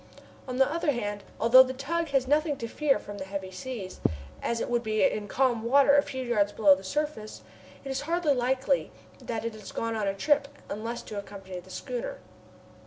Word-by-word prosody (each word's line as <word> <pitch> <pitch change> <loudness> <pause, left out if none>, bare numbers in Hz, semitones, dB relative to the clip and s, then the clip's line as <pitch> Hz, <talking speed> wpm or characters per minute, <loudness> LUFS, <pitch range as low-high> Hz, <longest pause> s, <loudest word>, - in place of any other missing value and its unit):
On 255 -1 -4
the 265 - +6
other 325 -1 0
hand, 205 -4 -3 0.2
although 235 +3 +8
the 260 0 +1
tug 330 +5 -1
has 270 -3 +1
nothing 300 +1 +2
to 230 - -4
fear 285 +3 +2
from 205 0 -9
the - - -3
heavy 190 -1 -5
seas, 190 0 -7 0.4
as 235 - -1
it - - -2
would 240 -1 +1
be 215 -2 0
in 215 -7 +1
calm 245 0 +1
water 280 +4 +5
a 285 - +7
few 260 -3 -5
yards 210 -5 +1
below 200 -3 +6
the 190 +1 -4
surface, 285 -1 -3 0.4
it - - -5
is 270 +1 -2
hardly 330 0 +1
likely 260 +2 +1 0.3
that 225 -1 -4
it 230 - -2
has 215 -2 -10
gone 230 0 -2
on 210 -2 -1
a 195 - 0
trip 290 +7 +2 0.2
unless 230 +3 -4
to 210 - -5
accompany 195 -2 -8
the 180 - -15
schooner. - - -5
240 Hz, 205 wpm, -28 LUFS, 210-280 Hz, 0.4 s, although